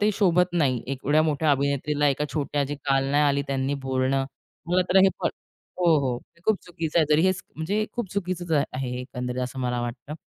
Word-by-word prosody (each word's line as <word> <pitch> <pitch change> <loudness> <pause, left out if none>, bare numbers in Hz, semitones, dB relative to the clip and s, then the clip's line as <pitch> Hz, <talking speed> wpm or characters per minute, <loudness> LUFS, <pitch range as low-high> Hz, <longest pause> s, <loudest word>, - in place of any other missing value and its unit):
ते 210 +1 +3
शोभत 180 -2 +3
नाही, 135 -8 +1
एवढ्या 140 +3 +1
मोठ्या 155 0 +1
अभिनेत्रीला 140 +1 +1
एका 145 +2 0
छोट्या 145 -1 -1
जे 145 +2 -4
काल 135 -1 +2
नाही 145 +1 +3
आली 140 0 +2
त्यांनी 135 +1 -1
बोलणं. 130 +1 +1 0.4
मला 180 +1 +3
तर - - +4
हे 195 - +7
प - - -5 0.5
हो, 175 -1 +3
हो. 125 -3 -1 0.3
खूप 220 -2 +3
चुकीचं 165 -2 -2
आहे 155 - +4
तरी 155 - +4
हेच 185 0 +1
म्हणजे 200 +7 0
खूप 240 -6 -4
चुकीचचं 175 -6 0
आहे 130 -1 -3
एकंदरीत 125 -1 -4
असं 125 +1 -5
मला 125 -1 -1
वाटतं 120 +5 -5
145 Hz, 190 wpm, -25 LUFS, 135-175 Hz, 0.5 s, हे